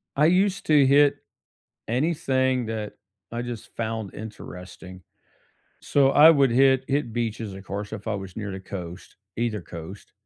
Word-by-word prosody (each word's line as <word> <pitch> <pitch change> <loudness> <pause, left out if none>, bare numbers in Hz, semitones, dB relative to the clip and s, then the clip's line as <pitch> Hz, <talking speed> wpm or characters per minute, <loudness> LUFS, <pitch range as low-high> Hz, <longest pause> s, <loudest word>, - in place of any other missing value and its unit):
I 150 - +4
used 195 +2 +2
to 150 -3 +5
hit 140 +1 +5 0.7
anything 130 -2 0
that 110 -2 -4 0.4
I 120 +1 -3
just 120 -3 -8
found 110 -3 -4
interesting; 95 -3 -10 0.8
so, 135 -1 +3
I 155 +3 +8
would 140 -5 +4
hit 130 +1 +4
hit 135 -4 -1
beaches, 115 -3 -3
of 95 0 -10
course, 100 +2 -5
if 105 0 -7
I 110 - -1
was 95 -2 -7
near 105 -2 -4
the 95 - -6
coast, 90 -2 -8 0.2
either 115 -3 -1
coast. 85 +4 -10
115 Hz, 150 wpm, -25 LUFS, 100-135 Hz, 0.8 s, I